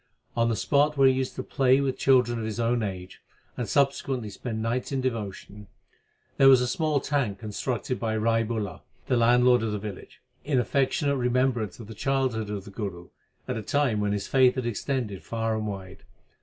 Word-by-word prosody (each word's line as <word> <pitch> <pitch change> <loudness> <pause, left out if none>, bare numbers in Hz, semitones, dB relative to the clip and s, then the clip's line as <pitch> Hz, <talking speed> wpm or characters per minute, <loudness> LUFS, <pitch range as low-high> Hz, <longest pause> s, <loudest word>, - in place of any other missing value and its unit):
On 115 0 +2
the 115 - +1
spot 145 +5 +2
where 135 -1 +6
he 130 - +5
used 130 0 -2
to - - -4
play 135 -1 +3
with 135 -2 0
children 125 -3 +3
of 110 - -3
his 110 +1 -4
own 120 +1 +1
age 95 -3 -6 0.3
and 120 - -4
subsequently 135 -5 0
spend 110 +2 -5
nights 115 +4 -2
in 135 - 0
devotion, 105 -4 -5 0.7
there 135 - +7
was 130 -2 +8
a 125 - 0
small 155 +3 0
tank 135 -8 -1
constructed 115 +4 -3
by 110 -1 -1
Rai 115 +1 +2
Bular, 105 -5 -4 0.2
the 125 - +1
landlord 125 +1 +4
of 110 -1 -1
the 105 - -2
village, 100 -2 -8 0.2
in 140 -2 +1
affectionate 140 +3 +1
remembrance 125 -4 0
of 115 - -8
the 110 - -9
childhood 130 -3 -1
of 100 -2 -5
the 100 - -10
Guru, 95 -5 -6 0.4
at 125 - -2
a - - -3
time 130 -2 +1
when 105 0 0
his 100 -1 -2
fame 130 -2 +4
had 130 -2 -3
extended 120 -2 -3
far 115 -1 -2
and 110 0 -2
wide. 95 -1 -7
120 Hz, 195 wpm, -26 LUFS, 105-130 Hz, 0.7 s, was